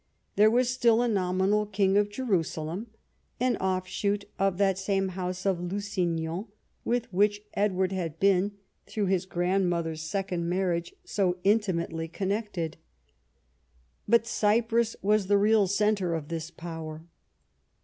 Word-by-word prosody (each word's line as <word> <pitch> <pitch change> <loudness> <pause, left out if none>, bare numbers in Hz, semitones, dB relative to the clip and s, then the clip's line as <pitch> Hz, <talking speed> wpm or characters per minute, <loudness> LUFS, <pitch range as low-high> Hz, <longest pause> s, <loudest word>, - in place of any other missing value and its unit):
There 210 +1 +6
was 245 +2 +2
still 240 -2 +3
a - - +1
nominal 195 0 +1
King 195 -1 +2
of 205 0 +3
Jerusalem, 190 -4 -2 0.5
an 250 -1 +2
offshoot 190 +2 -1
of 195 -2 +1
that 195 -1 +2
same 195 0 0
house 185 0 -4
of 190 -3 +1
Lusignan 180 -2 -2 0.4
with 240 -4 -1
which 205 +2 +2
Edward 190 -2 +1
had 165 -4 -3
been, 195 +1 +3 0.3
through 210 -2 -1
his 185 -1 0
grandmother's 175 -3 0
second 175 0 -2
marriage, 175 -2 -1
so 185 -3 0
intimately 185 -6 +1
connected. 190 -2 -3 1.3
But 235 -1 +4
Cyprus 230 +1 +1
was 210 -1 +2
the 205 +1 +4
real 210 0 +4
centre 200 -3 +1
of 155 -2 -5
this 165 -1 -4
power. 165 -2 -7
195 Hz, 130 wpm, -28 LUFS, 175-210 Hz, 1.3 s, There